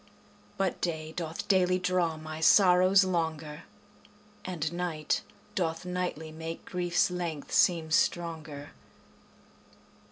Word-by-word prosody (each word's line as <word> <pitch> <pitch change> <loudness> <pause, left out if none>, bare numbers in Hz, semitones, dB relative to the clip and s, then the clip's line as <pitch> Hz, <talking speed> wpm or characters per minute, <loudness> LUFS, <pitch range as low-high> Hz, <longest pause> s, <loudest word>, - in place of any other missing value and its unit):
But 195 -2 -1
day 160 -2 -2
doth 165 -1 -5
daily 185 -2 +3
draw 180 -3 0
my 155 0 -7
sorrows 185 +2 +6
longer, 160 -4 -2 0.8
And 165 -3 -3
night 170 -4 -1 0.3
doth 165 -2 -2
nightly 180 -3 -3
make 160 +1 -7
grief's 175 0 0
length 170 -5 -4
seem 165 -3 +3
stronger. 160 -4 -1
170 Hz, 100 wpm, -29 LUFS, 160-180 Hz, 0.8 s, sorrows